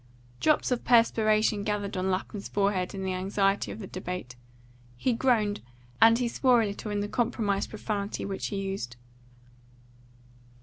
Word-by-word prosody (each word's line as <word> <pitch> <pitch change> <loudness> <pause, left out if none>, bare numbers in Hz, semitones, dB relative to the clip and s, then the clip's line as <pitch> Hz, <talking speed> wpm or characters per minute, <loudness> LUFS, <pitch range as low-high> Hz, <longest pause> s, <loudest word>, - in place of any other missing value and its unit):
Drops 305 -4 +2
of 245 - 0
perspiration 215 -3 +3
gathered 205 -1 -2
on 185 +1 -1
Lapham's 195 +2 -3
forehead 200 -2 0
in 190 - -4
the 190 -1 -1
anxiety 195 +2 0
of - - -7
the 215 - -7
debate; 180 -9 -6 0.6
he 245 - +1
groaned, 225 -4 +1 0.4
and 230 0 +7
he 245 0 0
swore 245 0 +3
a - - +1
little 205 +1 -5
in 205 0 -1
the 205 - -2
compromise 215 -4 0
profanity 210 -2 -4
which 195 -1 -3
he 200 - -3
used. 195 -11 -4
205 Hz, 150 wpm, -28 LUFS, 195-225 Hz, 0.6 s, and